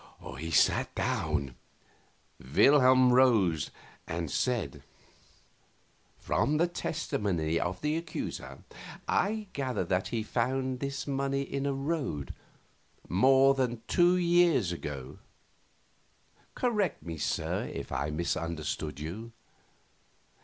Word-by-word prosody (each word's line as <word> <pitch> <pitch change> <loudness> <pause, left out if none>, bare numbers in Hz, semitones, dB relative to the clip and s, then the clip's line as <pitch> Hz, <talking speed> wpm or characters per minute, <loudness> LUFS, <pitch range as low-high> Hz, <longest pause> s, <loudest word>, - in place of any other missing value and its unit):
He 80 +1 -4
sat 80 - +3
down. 65 -3 -1 0.9
Wilhelm 130 - +5
rose 110 - +4 0.4
and 85 -3 -3
said: 100 - -1 1.4
"From 150 +2 0
the 170 - +4
testimony 95 - -1
of 90 +1 -3
the 150 +1 0
accuser 165 -1 -6 0.4
I 215 +2 +1
gather 130 -5 -1
that 95 0 0
he 115 -2 -2
found 130 +3 -1
this 140 0 -3
money 140 0 -1
in 140 0 -3
a 140 - 0
road 135 - -3 0.7
more 135 +8 +5
than 125 -4 -1
two 175 +1 +4
years 170 - +3
ago. 70 -6 -6 1.4
Correct 210 - 0
me, 80 -2 -6
sir, - - -1
if - - -6
I 70 +3 -1
misunderstood 80 -2 -3
you." 100 +10 -6
125 Hz, 105 wpm, -30 LUFS, 85-140 Hz, 1.4 s, Wilhelm